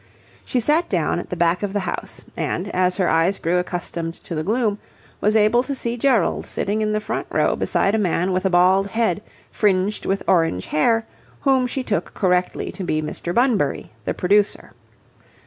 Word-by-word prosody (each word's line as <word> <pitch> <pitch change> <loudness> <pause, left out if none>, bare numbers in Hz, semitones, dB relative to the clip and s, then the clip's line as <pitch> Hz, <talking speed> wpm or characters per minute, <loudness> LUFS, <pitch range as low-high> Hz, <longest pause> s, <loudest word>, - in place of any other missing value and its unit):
She 250 - -1
sat 300 +8 +1
down 175 -2 0
at - - -7
the - - -3
back 170 +1 +2
of 205 -2 -3
the 205 - 0
house, 185 - -5
and, 185 +4 -2
as 180 -1 +1
her 185 -3 +2
eyes 165 +4 +2
grew 175 +2 +1
accustomed 175 -2 -4
to - - -7
the 155 - -1
gloom, 210 +3 0 0.4
was 210 +1 +1
able 220 +3 +4
to 275 +2 -4
see 235 -2 -3
Gerald 240 -6 +1
sitting 210 +2 -2
in 215 0 0
the 215 - +1
front 210 - -4
row - - +1
beside 195 - +1
a 220 - +2
man 180 -1 +1
with 185 0 0
a 190 - +2
bald 185 +2 +4
head 220 -3 0 0.3
fringed 200 0 +1
with 195 +1 0
orange 165 - +2
hair 225 +9 +2 0.4
whom 265 -2 +3
she 260 +1 -3
took 210 -4 -2
correctly 180 -2 0
to 195 - -7
be 155 -3 0
Mr. 155 +2 -4
Bunbury, 220 - +1
the - - -1
producer. 205 +3 +1
195 Hz, 190 wpm, -21 LUFS, 175-220 Hz, 0.4 s, able